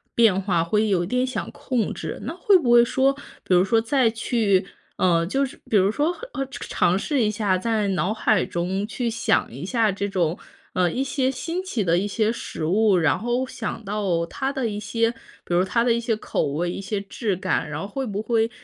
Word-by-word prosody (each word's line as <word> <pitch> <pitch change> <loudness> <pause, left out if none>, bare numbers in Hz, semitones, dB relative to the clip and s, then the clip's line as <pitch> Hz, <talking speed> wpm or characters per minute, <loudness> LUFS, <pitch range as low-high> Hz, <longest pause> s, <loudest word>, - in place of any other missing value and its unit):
变 215 -5 +4
化， 180 -4 +1
会 210 +5 +1
有 175 -3 +2
点 250 +6 0
想 255 - -4
控 260 -5 -2
制。 - - -6
那 - - -4
会 380 +2 +5
不 250 -9 0
会 240 0 +8
说， 265 +3 +2 0.3
比 185 - 0
如 180 - +6
说 225 +4 +3
再 230 +1 +2
去 220 -4 +1 0.3
呃， 170 -2 +3
就 275 +7 +1
是， 260 - -9
比 215 - +4
如 195 +1 +4
说， 295 +7 0 0.3
哦， 270 - -1
尝 - - -8
尝 180 +2 +2
试 285 -1 0
一 210 - +2
下， 205 -3 0
在 215 -2 0
脑 185 +2 0
海 215 -3 +2
中 185 +4 -2
去 245 +1 -3
想 230 - 0
一 135 - -7
下 220 +2 +1
这 200 +1 -3
种 175 -3 0 0.4
呃， 180 -2 +2
一 265 - -1
些 265 -1 0
新 330 +8 -3
奇 250 - -2
的 170 -1 +2
一 205 - -1
些 215 +2 +1
食 160 -8 -5
物， 205 +3 +3
然 165 -2 +2
后 240 +3 0
想 225 -3 -6
到 195 -5 0
它 270 +10 -3
的 265 -4 -1
一 205 -1 -4
些 230 +2 0 0.3
比 - - -3
如 175 +1 +4
它 230 +5 +1
的 240 -1 +3
一 235 - 0
些 230 -1 0
口 215 - -2
味、 170 +5 -1
一 195 - -5
些 200 +1 -3
质 200 +1 -3
感。 185 - -1
然 - - -4
后 200 - -4
会 265 +5 -4
不 205 -1 -3
会 225 0 +1
215 Hz, 240 characters per minute, -23 LUFS, 190-240 Hz, 0.4 s, 会